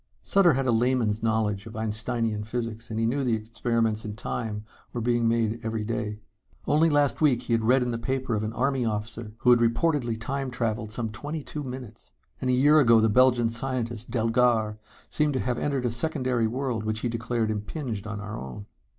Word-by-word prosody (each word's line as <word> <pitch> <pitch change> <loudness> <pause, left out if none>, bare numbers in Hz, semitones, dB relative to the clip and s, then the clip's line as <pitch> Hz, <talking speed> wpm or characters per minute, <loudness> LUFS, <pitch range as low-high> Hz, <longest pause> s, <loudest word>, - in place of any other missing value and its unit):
Sutter 190 -5 +4
had 135 +1 0
a 125 - +3
layman's 115 -2 +1
knowledge 110 -2 0
of 110 - -10
Einsteinian 110 0 -1
physics, 115 0 -4
and 110 0 -3
he 115 - +2
knew 135 +5 0
that 120 -3 +2
experiments 115 0 -1
in 105 -1 -5
Time 110 -2 -4 0.3
were 120 - -2
being 120 0 +1
made 115 -1 +1
every 110 -1 -2
day. 105 -1 -3 0.5
Only 155 +3 +4
last 145 -1 +2
week 130 -5 +3
he 120 - -1
had 115 - +3
read 125 +3 +4
in 125 - -1
the 115 - -3
paper 130 +1 -2
of 105 - 0
an 110 0 -2
army 130 +1 0
officer 110 0 -3
who 125 - +4
had 120 - +6
reportedly 120 0 +1
Time 135 +2 -3
traveled 115 -3 -2
some 115 -1 -3
twenty 145 +7 -5
two 150 - -5
minutes. 125 -4 -8 0.3
And 130 - 0
a - - +3
year 145 +4 +6
ago 115 -5 +6
the 110 0 +3
Belgian 125 0 +4
scientist, 120 -1 -3
Delgar, 115 -2 +2 0.4
claimed 150 -1 +2
to 130 - 0
have 125 -1 -1
entered 140 -3 -1
a 120 - +1
secondary 125 -3 0
world 125 -1 -2
which 110 0 -2
he - - 0
declared 115 -1 -1
impinged 110 0 -4
on 105 -1 -4
our 105 +1 -6
own. 65 +10 -8
115 Hz, 200 wpm, -26 LUFS, 110-130 Hz, 0.5 s, had